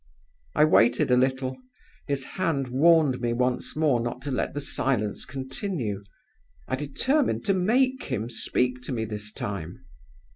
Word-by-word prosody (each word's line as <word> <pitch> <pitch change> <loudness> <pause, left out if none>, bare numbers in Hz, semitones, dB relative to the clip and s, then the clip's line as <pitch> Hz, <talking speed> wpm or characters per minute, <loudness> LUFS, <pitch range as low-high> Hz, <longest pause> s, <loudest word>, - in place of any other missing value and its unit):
"I 150 - +6
waited 120 -4 +4
a - - +6
little. 130 +1 0 0.5
His 140 -2 0
hand 155 -6 -1
warned 145 -1 +4
me 120 -1 0
once 125 +1 -1
more 150 -5 +3
not 120 +1 -3
to 145 - -3
let 130 - -2
the - - -1
silence 125 -6 -1
continue. 130 - -3 0.7
I - - 0
determined 255 - 0
to 200 - +3
make 255 +8 +2
him 110 +2 -2
speak 125 +2 -1
to - - -4
me 115 -3 -1
this 105 0 -5
time. 95 -6 -6
130 Hz, 150 wpm, -26 LUFS, 120-155 Hz, 0.7 s, I